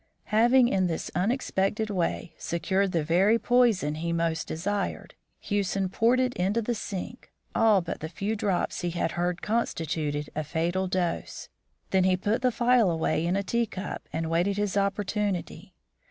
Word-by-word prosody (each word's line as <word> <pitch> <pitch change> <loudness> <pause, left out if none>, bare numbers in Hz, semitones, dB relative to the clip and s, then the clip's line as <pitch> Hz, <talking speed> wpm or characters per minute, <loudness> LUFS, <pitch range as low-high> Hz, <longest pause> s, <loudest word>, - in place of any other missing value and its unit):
Having 240 +3 +5
in 190 -4 +2
this 165 -2 -3
unexpected 210 0 0
way 175 -3 -2
secured 190 +3 0
the 165 -3 0
very 185 +8 +4
poison 230 -11 +2
he 165 +2 -3
most 165 -1 -1
desired, 200 +5 -3 0.3
Hewson 195 -2 -1
poured 230 +6 +3
into 230 -4 +1
the 230 +2 -1
sink 215 +2 -6 0.2
all 220 -4 +4
but 170 - -5
the 160 - -5
few 200 +5 -2
drops 200 -4 -1
he 175 - -1
had 170 -1 -1
heard 175 +1 -2
constituted 155 -9 -1
a 155 - -1
fatal 175 +5 -1
dose. 180 -2 -2 0.4
Then 190 -1 +3
he 185 -1 +3
put 205 +5 0
the 255 -1 +3
phial 240 -3 +3
away 160 -1 0
in 180 - +1
a 200 - 0
tea 235 +4 0
cup 195 0 -6
and 160 +1 -2
waited 175 +5 +1
his 205 -1 -1
opportunity. 200 -1 -2
190 Hz, 160 wpm, -27 LUFS, 170-215 Hz, 0.4 s, Having